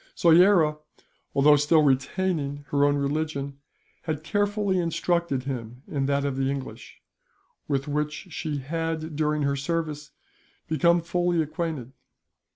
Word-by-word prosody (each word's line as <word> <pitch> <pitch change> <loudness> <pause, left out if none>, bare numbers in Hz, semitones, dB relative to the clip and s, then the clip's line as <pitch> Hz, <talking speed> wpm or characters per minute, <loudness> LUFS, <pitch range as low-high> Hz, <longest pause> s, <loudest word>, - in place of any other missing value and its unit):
Soyera, 170 -2 +5 0.6
although 145 +2 +6
still 150 +2 +4
retaining 145 +1 0
her 145 0 +3
own 145 0 +3
religion, 140 -1 -2 0.5
had 155 -2 -3
carefully 205 0 0
instructed 170 -4 0
him 125 -2 -6
in 135 -2 -1
that 140 0 +1
of 140 -2 -2
the 135 0 0
English; 130 -5 -7 0.6
with 135 -1 -1
which 150 +4 -3
she 155 -2 -3
had, 160 +2 -3
during 150 0 0
her 140 0 +1
service, 150 +1 -3 0.6
become 170 +2 +3
fully 175 0 0
acquainted. 155 -5 -3
150 Hz, 125 wpm, -26 LUFS, 140-165 Hz, 0.6 s, although